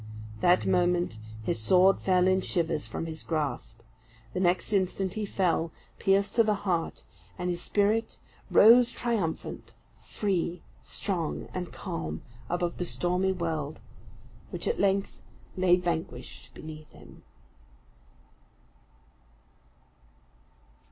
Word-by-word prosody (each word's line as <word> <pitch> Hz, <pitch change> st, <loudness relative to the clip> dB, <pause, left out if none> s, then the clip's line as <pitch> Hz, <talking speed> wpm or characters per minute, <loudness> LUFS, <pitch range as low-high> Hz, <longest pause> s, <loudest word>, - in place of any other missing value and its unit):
That 175 Hz, +9 st, +4 dB
moment 175 Hz, -9 st, +1 dB, 0.2 s
his 110 Hz, -, -1 dB
sword 185 Hz, -, +5 dB
flew 185 Hz, -1 st, +3 dB
in 185 Hz, 0 st, +3 dB
shivers 165 Hz, -4 st, -1 dB
from -, -, -4 dB
his 160 Hz, -1 st, -6 dB
grasp. 145 Hz, -7 st, -3 dB, 0.5 s
The -, -, -2 dB
next 185 Hz, +3 st, +1 dB
instant 190 Hz, -1 st, 0 dB
he 215 Hz, -2 st, -3 dB
fell, 170 Hz, -4 st, 0 dB, 0.3 s
pierced 200 Hz, +1 st, +2 dB
to 230 Hz, -, +7 dB
the 210 Hz, -1 st, +2 dB
heart; 170 Hz, -4 st, -1 dB, 0.3 s
and 180 Hz, 0 st, -1 dB
his 175 Hz, 0 st, -2 dB
spirit 215 Hz, +4 st, +1 dB, 0.3 s
rose 240 Hz, +2 st, +7 dB
triumphant, 220 Hz, -11 st, -3 dB, 0.3 s
free, 180 Hz, -4 st, -2 dB, 0.2 s
strong, 175 Hz, -6 st, -3 dB
and 180 Hz, -1 st, -4 dB
calm, 80 Hz, -1 st, -5 dB, 0.3 s
above 175 Hz, 0 st, -1 dB
the 180 Hz, -, -1 dB
stormy 180 Hz, +2 st, 0 dB
world, 160 Hz, -4 st, -3 dB, 0.7 s
which -, -, -4 dB
at 465 Hz, -, 0 dB
length 195 Hz, 0 st, +1 dB, 0.3 s
lay 185 Hz, -1 st, +5 dB
vanquished 160 Hz, -8 st, -4 dB
beneath 155 Hz, -1 st, -9 dB
him. -, -, -15 dB
180 Hz, 110 wpm, -28 LUFS, 165-195 Hz, 0.7 s, to